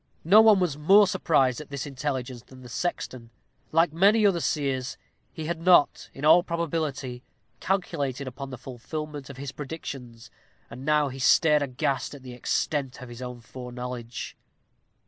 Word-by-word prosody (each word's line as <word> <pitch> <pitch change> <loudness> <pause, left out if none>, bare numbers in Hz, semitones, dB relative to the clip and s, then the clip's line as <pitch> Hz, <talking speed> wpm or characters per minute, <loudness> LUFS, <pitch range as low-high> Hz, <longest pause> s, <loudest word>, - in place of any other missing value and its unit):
No 200 +7 +7
one 220 -3 +6
was 160 -6 -1
more 195 +7 +7
surprised 140 -8 +1
at 150 - -12
this 140 -2 -4
intelligence 130 -3 -4
than 130 +1 -15
the 125 - -11
sexton. 125 -5 -4 0.4
Like 165 0 +3
many 205 +6 +4
other 190 -4 +3
seers, 140 -4 -1 0.3
he 160 - -6
had 165 0 -3
not, 175 -4 +4
in 135 - -6
all 160 +3 +7
probability, 155 -7 -3 0.4
calculated 145 -8 -2
upon 135 +2 -7
the 130 - -7
fulfilment 135 +4 -7
of 140 - -9
his 140 0 -5
predictions, 130 -6 -8 0.4
and 120 - -8
he - - -8
now 150 -2 +2
stared 150 +3 +4
aghast 135 +1 -2
at 135 - -13
the 125 -1 -8
extent 135 +2 -2
of 125 -2 -9
his 120 +1 -10
own 125 -1 -7
foreknowledge. 125 -1 -7
140 Hz, 160 wpm, -26 LUFS, 125-160 Hz, 0.4 s, No